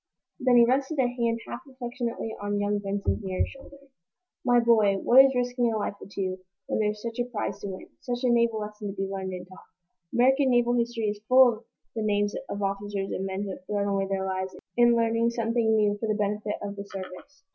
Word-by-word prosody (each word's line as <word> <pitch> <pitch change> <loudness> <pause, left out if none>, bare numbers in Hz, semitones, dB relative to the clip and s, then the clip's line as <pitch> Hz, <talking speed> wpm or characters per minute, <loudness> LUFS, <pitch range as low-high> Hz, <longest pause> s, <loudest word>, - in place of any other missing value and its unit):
Then 250 -1 +4
he 235 - +8
rested 270 +5 0
a 260 -2 +3
hand 235 -2 -1
half - - -5
affectionately 240 -3 -4
on 205 0 -1
young 205 0 0
Benson's 200 +1 -2
nearer 190 -1 0
shoulder. 275 +1 -13 0.7
"My 245 -1 +4
boy, 220 -4 +4
what 255 +7 +7
is 270 -1 +2
risking 245 -1 +1
a 220 - -1
life 205 - -2
or - - -9
two, 185 -2 -3 0.3
when - - -1
there's 210 0 -1
such 230 +1 -5
a 240 - +1
prize 210 -3 -3
to 200 - -6
win 190 -1 -7
such 245 -2 -4
a 250 - +3
naval 235 -2 +2
lesson 210 0 -6
to 195 - -5
be 195 -1 -2
learned 190 -1 -4
and 180 0 -7
taught? 185 - -13 0.5
American 265 +3 +4
naval 240 -1 +3
history 235 -1 -1
is 205 0 -5
full 255 -1 +7
of 225 +1 -12 0.3
the 225 - -2
names 205 -1 +1 0.2
of 200 0 -3
officers 195 0 -2
and 190 - -2
men 190 +1 -3
who 200 - -4
have 185 - -9
thrown 205 -1 -1
away 195 -1 0
their 190 0 -1
lives 190 0 -3 0.2
in 240 0 +5
learning 230 0 +2
something 230 -1 +1
new 210 -1 +3
for 225 - -2
the 215 - +1
benefit 210 0 -1
of 200 0 -5
the 200 - -6
service." 195 +10 -10
215 Hz, 220 wpm, -27 LUFS, 200-240 Hz, 0.7 s, he